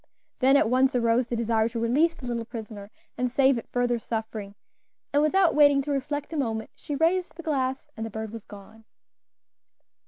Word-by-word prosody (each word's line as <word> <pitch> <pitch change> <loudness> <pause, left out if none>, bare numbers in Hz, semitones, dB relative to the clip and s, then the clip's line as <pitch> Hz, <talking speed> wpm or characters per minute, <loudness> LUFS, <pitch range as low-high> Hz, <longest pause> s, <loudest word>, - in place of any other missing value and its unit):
Then 270 +2 +5
at 280 - +3
once 255 +2 +2
arose 235 0 +2
the 240 - -2
desire 225 -1 +1
to 230 0 -4
release 285 +9 +2
the 255 - -10
little 235 -1 -2
prisoner 220 -3 -8 0.3
and 250 0 +1
save 265 0 +3
it - - -12
further 245 -1 +1
suffering, 220 -3 -5 0.6
and 290 - +4
without 340 +3 +3
waiting 285 -2 +5
to 290 - -3
reflect 290 +3 -3
a - - -2
moment 225 -5 -2
she 290 - -6
raised 345 +4 +1
the 335 - -8
glass, 270 -2 -1
and 220 - -5
the 225 - -4
bird 220 0 -6
was 225 -2 -8
gone. 215 +2 -14
245 Hz, 190 wpm, -26 LUFS, 225-285 Hz, 0.6 s, Then